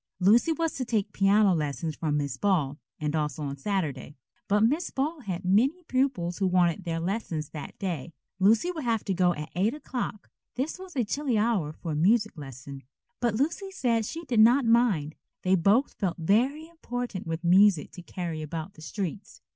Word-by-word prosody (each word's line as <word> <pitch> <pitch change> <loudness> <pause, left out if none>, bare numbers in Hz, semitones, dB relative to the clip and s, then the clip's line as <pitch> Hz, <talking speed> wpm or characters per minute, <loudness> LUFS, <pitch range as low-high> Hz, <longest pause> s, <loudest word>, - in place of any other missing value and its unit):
Lucy 220 - +4
was 325 0 -1
to 260 - -3
take 225 -5 -1
piano 200 0 +4
lessons 150 -1 -2
from 150 -1 -1
Miss 140 -3 -2
Ball, 155 -6 0 0.2
and 150 0 -1
also 150 -1 -2
on 140 -1 -3
Saturday. 150 -3 -3 0.3
But 205 +1 +3
Miss 295 +10 +1
Ball 300 +4 -2
had 185 -8 -5
many 255 - +2
pupils 255 - -1
who 195 - +2
wanted 180 0 +2
their 165 -1 -2
lessons 170 -4 -3
that 150 -3 -8
day. 170 -5 -4 0.3
Lucy 220 - +4
would 320 -4 -5
have 230 -3 0
to 195 - 0
go 180 -1 +2
at 150 +1 -7
eight 205 +9 +1
o'clock. 250 -7 -5 0.2
This 275 +8 -3
was 375 -3 -10
a 250 - +2
chilly 265 +1 -1
hour 210 -8 +1
for 160 +1 -6
a - - -2
music 210 +7 +2
lesson, 135 -2 -9 0.4
but 235 -3 +1
Lucy 330 - -1
said 235 - 0
she 330 +1 -6
did 245 -5 +1
not 240 +4 +6
mind. 225 -11 +3 0.3
They 185 - +2
both 200 - +3
felt 190 -5 -1
very 245 - +1
important 245 - -5
with 165 +1 -3
music 185 -1 +4
to 180 - -10
carry 170 -3 -5
about 160 +4 -5
the 155 - -15
streets. 190 +4 -5
195 Hz, 185 wpm, -27 LUFS, 165-245 Hz, 0.4 s, not